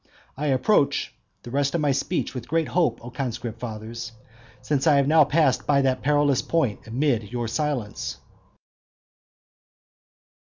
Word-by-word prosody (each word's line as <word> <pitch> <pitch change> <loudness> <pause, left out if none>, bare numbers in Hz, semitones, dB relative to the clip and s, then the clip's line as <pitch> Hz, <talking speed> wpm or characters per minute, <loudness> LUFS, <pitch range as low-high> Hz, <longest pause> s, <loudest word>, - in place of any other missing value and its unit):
I 150 +2 -3
approach 140 +3 +2 0.3
the 120 - -9
rest 140 +3 0
of 170 - +1
my 145 -2 +2
speech 165 +6 -1
with 125 -3 -6
great 165 0 0
hope, 160 -10 +1
O 120 - -8
conscript 120 -3 -4
fathers, 115 0 -6 0.5
since 145 0 0
I 150 - +6
have 140 -1 +3
now 155 +1 +6
passed 150 -3 +2
by 140 -1 +3
that 130 -1 +1
perilous 145 -1 +2
point 130 -11 -1
amid 115 -3 0
your 120 -1 -2
silence. 125 -5 -3
135 Hz, 145 wpm, -24 LUFS, 120-150 Hz, 0.5 s, I